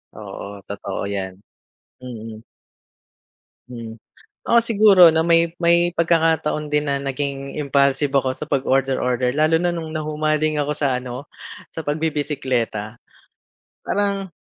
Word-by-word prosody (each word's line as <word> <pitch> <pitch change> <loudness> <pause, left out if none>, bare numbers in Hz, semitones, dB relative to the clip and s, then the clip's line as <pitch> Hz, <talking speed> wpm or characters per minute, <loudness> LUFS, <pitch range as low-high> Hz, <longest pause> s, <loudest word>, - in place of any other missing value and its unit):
Oo, 100 -1 -9
totoo 100 -1 -5
yan. 95 -2 -4 0.7
Mm. 115 -3 -8 1.3
Hmm, 115 -2 -8 0.4
ako 235 - +4
siguro 215 -4 +5
'no 160 - +3
may 165 0 +3
may 170 +1 +3
pagkakataon 160 -2 +1
din 150 -1 0
na 140 - 0
naging 140 0 -4
impulsive 140 -1 +1
ako 135 -1 +1
sa - - -13
'pag 135 -2 0
order-order. 130 -2 +1
Lalo 155 +4 +2
na 175 - +2
noong 165 -2 -5
nahumaling 155 0 0
ako 145 0 -1
sa 140 -4 0
ano, 125 +2 -8 0.4
sa 160 - -7
pagbibisikleta. 140 -8 -2 0.8
Parang 200 -1 -1
145 Hz, 120 wpm, -21 LUFS, 125-160 Hz, 1.3 s, siguro